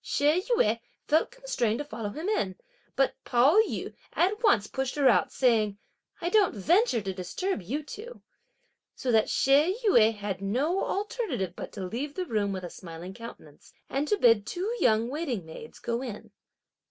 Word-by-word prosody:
She 300 Hz, +5 st, +2 dB
Yüeh 230 Hz, -, +3 dB, 0.3 s
felt 315 Hz, +2 st, +3 dB
constrained 255 Hz, -, -1 dB
to 290 Hz, -, -4 dB
follow 225 Hz, -7 st, -5 dB
him 315 Hz, -, -5 dB
in, 200 Hz, -, 0 dB, 0.4 s
but 270 Hz, -, +2 dB
Pao 270 Hz, -, +4 dB
yü 440 Hz, -, -4 dB, 0.2 s
at 405 Hz, +5 st, +1 dB
once 230 Hz, -, +4 dB
pushed 265 Hz, +3 st, -3 dB
her 285 Hz, -2 st, +3 dB
out, -, -, +4 dB
saying: 220 Hz, -5 st, +2 dB, 0.4 s
"I 345 Hz, -1 st, -1 dB
don't 400 Hz, -, +3 dB
venture 330 Hz, -, +3 dB
to 190 Hz, -1 st, -3 dB
disturb 195 Hz, -, -3 dB
you 265 Hz, -, -3 dB
two;" 440 Hz, -, -10 dB, 0.7 s
so 255 Hz, -, -2 dB
that 220 Hz, -1 st, +3 dB
She 295 Hz, +9 st, +3 dB
Yüeh 225 Hz, -, +5 dB
had 205 Hz, -2 st, -4 dB
no 275 Hz, -, 0 dB
alternative 400 Hz, -, -2 dB
but -, -, -7 dB
to 195 Hz, -3 st, -5 dB
leave 265 Hz, +10 st, -4 dB
the 370 Hz, -, -2 dB
room 210 Hz, -, 0 dB
with 190 Hz, -1 st, -4 dB
a 175 Hz, -, -5 dB
smiling 170 Hz, +1 st, -9 dB
countenance, 230 Hz, +3 st, -12 dB, 0.2 s
and 280 Hz, +2 st, 0 dB
to 420 Hz, -, +2 dB
bid 230 Hz, -, +4 dB
two 400 Hz, +7 st, -2 dB
young 225 Hz, -1 st, +3 dB
waiting 260 Hz, -, -3 dB
maids 195 Hz, +8 st, -10 dB
go 235 Hz, +1 st, -3 dB
in. 235 Hz, -6 st, -7 dB
250 Hz, 175 wpm, -28 LUFS, 210-350 Hz, 0.7 s, Yüeh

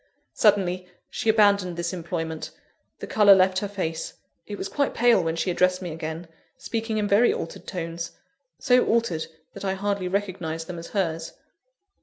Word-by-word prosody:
Suddenly, 185 Hz, -4 st, +2 dB, 0.2 s
she 225 Hz, -, -1 dB
abandoned 200 Hz, -5 st, +4 dB
this 170 Hz, +1 st, -2 dB
employment; 165 Hz, -2 st, -4 dB, 0.5 s
the -, -, -6 dB
colour 205 Hz, -2 st, +6 dB
left 190 Hz, 0 st, +3 dB
her 205 Hz, -, -3 dB
face; 185 Hz, -5 st, -4 dB, 0.3 s
it 205 Hz, -, -5 dB
was 195 Hz, -, -4 dB
quite 280 Hz, +5 st, -1 dB
pale 235 Hz, -6 st, +4 dB
when 165 Hz, 0 st, -1 dB
she 180 Hz, +2 st, 0 dB
addressed 185 Hz, +1 st, +2 dB
me 180 Hz, -3 st, -5 dB
again, 160 Hz, +2 st, -5 dB, 0.3 s
speaking 225 Hz, -1 st, -3 dB
in 210 Hz, -1 st, 0 dB
very 210 Hz, +4 st, +5 dB
altered 165 Hz, -, -6 dB
tones; 170 Hz, -1 st, -5 dB, 0.4 s
so 250 Hz, 0 st, +4 dB
altered, 225 Hz, -9 st, +1 dB, 0.3 s
that -, -, -9 dB
I 190 Hz, -1 st, 0 dB
hardly 200 Hz, -1 st, -1 dB
recognised 180 Hz, -4 st, -2 dB
them 175 Hz, -1 st, -6 dB
as 165 Hz, -, -8 dB
hers. 165 Hz, -5 st, -2 dB
185 Hz, 165 wpm, -25 LUFS, 165-205 Hz, 0.5 s, colour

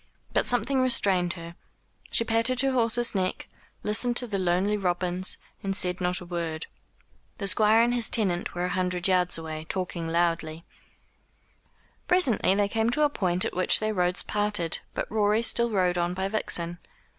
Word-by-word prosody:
But -, -, +1 dB
something 245 Hz, +3 st, +1 dB
restrained 195 Hz, -8 st, +2 dB
her. 170 Hz, -1 st, -9 dB, 0.6 s
She -, -, +2 dB
patted 230 Hz, +3 st, +1 dB
her 270 Hz, 0 st, +1 dB
horse's 240 Hz, -1 st, +1 dB
neck, 185 Hz, -2 st, -2 dB, 0.4 s
listened 240 Hz, +3 st, +2 dB
to 250 Hz, -, +5 dB
the 205 Hz, -4 st, -3 dB
lonely 185 Hz, +3 st, +1 dB
robins, 180 Hz, -1 st, -1 dB, 0.2 s
and 195 Hz, -1 st, -2 dB
said 180 Hz, -1 st, +1 dB
not 180 Hz, 0 st, +2 dB
a 180 Hz, -, -10 dB
word. 170 Hz, -2 st, -4 dB, 0.7 s
The 200 Hz, -, -4 dB
Squire 215 Hz, +3 st, +4 dB
and 240 Hz, +1 st, +1 dB
his 240 Hz, -2 st, 0 dB
tenant 185 Hz, -7 st, -1 dB
were 175 Hz, +1 st, -1 dB
a -, -, -2 dB
hundred 180 Hz, -1 st, -1 dB
yards 180 Hz, -2 st, +2 dB
ahead, 160 Hz, -1 st, -7 dB
talking 180 Hz, -3 st, -3 dB
loudly. 165 Hz, -1 st, -1 dB, 1.4 s
Presently 265 Hz, -, +2 dB
they 205 Hz, 0 st, +1 dB
came 225 Hz, +2 st, 0 dB
to 300 Hz, +5 st, +2 dB
a 295 Hz, -, +4 dB
point 185 Hz, -8 st, 0 dB
at -, -, -4 dB
which 185 Hz, 0 st, +3 dB
their 215 Hz, 0 st, -1 dB
roads 180 Hz, -2 st, 0 dB
parted, 205 Hz, -5 st, -1 dB, 0.2 s
but -, -, -2 dB
Rorie 215 Hz, +1 st, +1 dB
still 235 Hz, 0 st, +2 dB
rode 180 Hz, -4 st, +1 dB
on 175 Hz, +1 st, -1 dB
by 190 Hz, +1 st, -2 dB
Vixen. 175 Hz, -5 st, -1 dB
190 Hz, 170 wpm, -26 LUFS, 175-225 Hz, 1.4 s, to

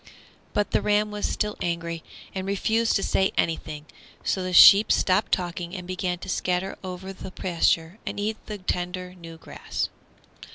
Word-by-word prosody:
But 205 Hz, 0 st, 0 dB
the -, -, +2 dB
ram 210 Hz, 0 st, +2 dB
was 210 Hz, 0 st, -2 dB
still 210 Hz, -1 st, -1 dB
angry, 170 Hz, -1 st, -3 dB, 0.3 s
and 190 Hz, 0 st, -4 dB
refused 220 Hz, +3 st, +1 dB
to 195 Hz, -, +1 dB
say 190 Hz, -, +2 dB
anything, 155 Hz, -2 st, -1 dB, 0.4 s
so 190 Hz, -, 0 dB
the 185 Hz, 0 st, -3 dB
sheep 200 Hz, +3 st, +9 dB
stopped 185 Hz, 0 st, +2 dB
talking 175 Hz, 0 st, -2 dB
and 180 Hz, -2 st, -6 dB
began 180 Hz, 0 st, -2 dB
to 175 Hz, -, -10 dB
scatter 185 Hz, 0 st, -1 dB
over 190 Hz, +1 st, -6 dB
the 190 Hz, -, -8 dB
pasture 170 Hz, 0 st, 0 dB
and -, -, -5 dB
eat 215 Hz, +1 st, -3 dB
the 210 Hz, -, -5 dB
tender, 180 Hz, -1 st, -3 dB
new 165 Hz, -2 st, -11 dB
grass. -, -, -4 dB
185 Hz, 165 wpm, -25 LUFS, 175-200 Hz, 0.4 s, sheep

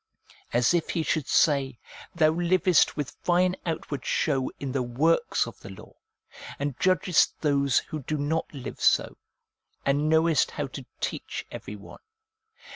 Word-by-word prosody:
As 120 Hz, +5 st, +3 dB
if 170 Hz, -2 st, 0 dB
he 165 Hz, -, -1 dB
should 155 Hz, -3 st, -1 dB
say, 140 Hz, -5 st, +2 dB, 0.2 s
' -, -, -16 dB
Thou 155 Hz, -2 st, +4 dB
livest 175 Hz, 0 st, +2 dB
with 145 Hz, -3 st, -3 dB
fine 180 Hz, +1 st, +2 dB
out 165 Hz, -2 st, -3 dB
ward 140 Hz, -, -3 dB
show 135 Hz, -4 st, 0 dB
in 135 Hz, -2 st, -4 dB
the 135 Hz, 0 st, -1 dB
works 135 Hz, +7 st, +1 dB
of -, -, -10 dB
the -, -, -11 dB
law, 95 Hz, -, -12 dB, 0.6 s
and 145 Hz, 0 st, -2 dB
judgest 185 Hz, -2 st, +2 dB
those 140 Hz, -3 st, +2 dB
who 155 Hz, -, -2 dB
do 150 Hz, +3 st, -3 dB
not 150 Hz, +3 st, -1 dB
live 135 Hz, -4 st, -8 dB
so, -, -, +3 dB, 0.7 s
and 145 Hz, +2 st, +1 dB
knowest 160 Hz, -2 st, +3 dB
how 145 Hz, -, -4 dB
to 135 Hz, -1 st, -9 dB
teach -, -, -4 dB
every 105 Hz, -, -7 dB
one. 100 Hz, -, -13 dB
150 Hz, 160 wpm, -26 LUFS, 135-165 Hz, 0.7 s, Thou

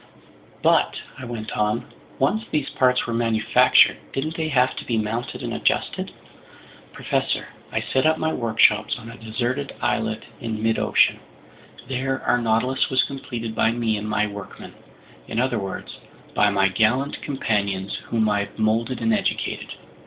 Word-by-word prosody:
"But," -, -, +3 dB, 0.2 s
I 130 Hz, -, -6 dB
went 115 Hz, -2 st, -5 dB
on, 105 Hz, 0 st, 0 dB, 0.3 s
"once 215 Hz, +12 st, +1 dB
these 150 Hz, -3 st, -1 dB
parts 125 Hz, -1 st, +2 dB
were 120 Hz, -, -3 dB
manufactured, 115 Hz, -1 st, +4 dB, 0.2 s
didn't 155 Hz, +4 st, -2 dB
they 160 Hz, -1 st, -1 dB
have 130 Hz, -4 st, +2 dB
to -, -, -4 dB
be 115 Hz, -, -1 dB
mounted 110 Hz, +3 st, -3 dB
and -, -, -3 dB
adjusted?" -, -, 0 dB, 0.8 s
"Professor, -, -, -1 dB, 0.2 s
I -, -, 0 dB
set 130 Hz, +4 st, +1 dB
up 160 Hz, 0 st, +3 dB
my 160 Hz, 0 st, 0 dB
workshops 115 Hz, -2 st, +3 dB
on 115 Hz, -1 st, -9 dB
a -, -, -10 dB
deserted 120 Hz, +5 st, -3 dB
islet -, -, -1 dB, 0.2 s
in 115 Hz, -2 st, -3 dB
midocean. 115 Hz, 0 st, +3 dB, 0.7 s
There 135 Hz, 0 st, -1 dB
our 125 Hz, -, +2 dB
Nautilus 115 Hz, +3 st, +1 dB
was 130 Hz, -1 st, +4 dB
completed 125 Hz, -5 st, -5 dB
by 115 Hz, +1 st, +2 dB
me 115 Hz, -2 st, 0 dB
and 105 Hz, +1 st, -4 dB
my 105 Hz, 0 st, +2 dB
workmen, 100 Hz, -2 st, -8 dB, 0.5 s
in 115 Hz, -, -2 dB
other 125 Hz, -2 st, +1 dB
words, 95 Hz, -1 st, -6 dB, 0.3 s
by 105 Hz, -, +4 dB
my 100 Hz, -1 st, +3 dB
gallant 115 Hz, +8 st, +1 dB
companions 100 Hz, -8 st, -1 dB
whom 110 Hz, -2 st, +1 dB
I've 100 Hz, -1 st, -1 dB
molded 115 Hz, +3 st, 0 dB
and 115 Hz, 0 st, +2 dB
educated. -, -, -2 dB
115 Hz, 155 wpm, -23 LUFS, 110-130 Hz, 0.8 s, manufactured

